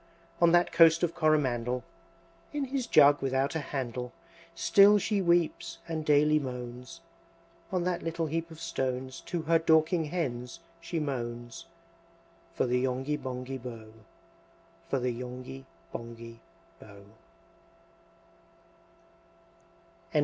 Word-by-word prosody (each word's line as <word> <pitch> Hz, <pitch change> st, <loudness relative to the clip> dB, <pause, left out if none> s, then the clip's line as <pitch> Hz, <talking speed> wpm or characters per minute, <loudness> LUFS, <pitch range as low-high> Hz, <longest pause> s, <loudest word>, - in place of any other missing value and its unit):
On 170 Hz, -1 st, +6 dB
that 175 Hz, 0 st, +4 dB
Coast 165 Hz, 0 st, +6 dB
of 170 Hz, -1 st, +1 dB
Coromandel, 125 Hz, -7 st, +1 dB, 0.7 s
In 290 Hz, -2 st, -1 dB
his 265 Hz, -2 st, -3 dB
jug 145 Hz, -6 st, +6 dB
without 135 Hz, +1 st, 0 dB
a 160 Hz, -, -1 dB
handle 125 Hz, -4 st, -4 dB, 0.4 s
Still 205 Hz, +1 st, +6 dB
she 205 Hz, 0 st, 0 dB
weeps, 170 Hz, -1 st, +1 dB
and 160 Hz, -2 st, -3 dB
daily 150 Hz, 0 st, +4 dB
moans; 125 Hz, +3 st, -7 dB, 0.7 s
On 180 Hz, -2 st, 0 dB
that 180 Hz, -1 st, -1 dB
little 165 Hz, 0 st, -2 dB
heap 165 Hz, +2 st, -3 dB
of 160 Hz, -1 st, -12 dB
stones 130 Hz, -5 st, -3 dB
To 170 Hz, -2 st, -2 dB
her 165 Hz, +1 st, +3 dB
Dorking 160 Hz, +1 st, +3 dB
Hens 140 Hz, -5 st, -4 dB, 0.2 s
she 165 Hz, 0 st, -3 dB
moans, 120 Hz, -5 st, -5 dB, 0.9 s
For -, -, +1 dB
the 125 Hz, 0 st, +1 dB
Yonghy 130 Hz, +3 st, -1 dB
Bonghy 130 Hz, -1 st, -5 dB
Bò, 115 Hz, -3 st, -9 dB, 1.0 s
For 140 Hz, -, +1 dB
the 125 Hz, -1 st, 0 dB
Yonghy 125 Hz, +2 st, -8 dB, 0.3 s
Bonghy 115 Hz, 0 st, -8 dB, 0.4 s
Bò. 100 Hz, -1 st, -13 dB
145 Hz, 115 wpm, -29 LUFS, 125-165 Hz, 1.0 s, On